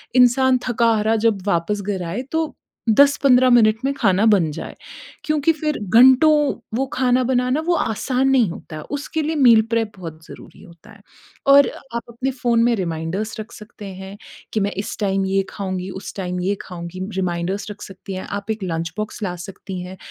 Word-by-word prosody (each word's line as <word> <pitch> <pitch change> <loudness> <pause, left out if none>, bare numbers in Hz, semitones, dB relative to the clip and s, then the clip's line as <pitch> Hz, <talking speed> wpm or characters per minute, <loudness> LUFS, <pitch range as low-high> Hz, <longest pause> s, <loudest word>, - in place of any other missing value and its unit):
इंसान 255 +1 +4
थका-हारा 225 -2 +2
जब 205 -4 0
वापस 200 +3 0
घर 195 -2 -3
आए 200 +9 -3
तो 320 -1 -1 0.4
10-15 260 0 +5
मिनट 220 -3 +5
में 275 - +1
खाना 200 -5 +2
बन 190 -7 +4
जाए, - - -7 0.5
क्योंकि 305 +1 +2
फिर 305 -1 -2 0.2
घंटों 260 +5 +7 0.5
वो 270 - +1
खाना 255 0 +2
बनाना 250 +2 +1
वो 350 - +3
आसान 260 0 0
नहीं 250 -8 +3
होता 165 - -10
है, - - -6
उसके 290 +2 -3
लिए 315 +2 -2
मील 240 -6 +6
प्रेप 225 -2 0
बहुत 160 -3 -9
ज़रूरी - - -13
होता 175 +2 -17
है 205 -2 -17 0.5
और 280 0 +7 0.3
आप 235 - -1
अपने 250 +3 -3
फ़ोन 240 -3 +1
में 240 0 +3
रिमाइंडर्स 185 +4 -3
रख 215 +1 -7
सकते 210 -1 -12
हैं 190 +1 -9 0.4
कि 220 - +1
मैं 200 - 0
इस 200 - -4
टाइम 195 -1 0
ये 195 0 +1
खाऊँगी, 185 -2 -4
उस 190 +1 -8
टाइम 180 -2 -3
ये 195 +3 0
खाऊँगी, 175 0 -8 0.2
रिमाइंडर्स 185 +2 -2
रख 210 0 -11
सकती 190 +1 -9
हैं, 185 - -5
आप 205 +1 -4
एक 220 -2 -4
लंच 165 -2 -3
बॉक्स 215 +1 -5
ला 180 -3 -2
सकती 190 -1 -8
हैं, 185 +1 -9
215 Hz, 185 wpm, -21 LUFS, 190-250 Hz, 0.5 s, घंटों